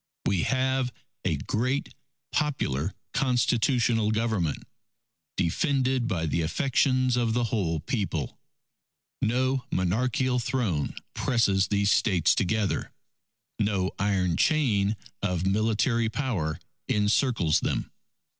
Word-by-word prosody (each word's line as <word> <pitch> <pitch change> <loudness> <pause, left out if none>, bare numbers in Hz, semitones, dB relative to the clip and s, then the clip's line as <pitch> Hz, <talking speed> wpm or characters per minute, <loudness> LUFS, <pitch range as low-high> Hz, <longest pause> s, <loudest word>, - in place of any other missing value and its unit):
We 95 -4 +2
have 130 +1 0 0.3
a - - 0
great, 130 +6 -1 0.4
popular 95 - -1 0.2
constitutional 120 -3 +2
Government... 110 -8 0 0.7
defended 130 - +1
by 85 -8 -1
the 85 +2 0
affections 130 - +1
of 120 -2 +1
the 120 +1 +1
whole 95 -9 -1
People. 90 - -3 0.8
No 130 +3 +1
monarchical 125 +7 +1
throne 120 - -1 0.2
presses 100 -6 +2
these 100 0 +2
States 90 -7 +3
together. 105 +1 0 0.7
No 100 -3 0
iron 95 -4 +1
chain 110 -10 +2 0.3
of 90 0 -1
military 110 +3 +1
power 110 - -2 0.3
encircles 105 - +2
them. - - -2
110 Hz, 100 wpm, -27 LUFS, 95-125 Hz, 0.8 s, States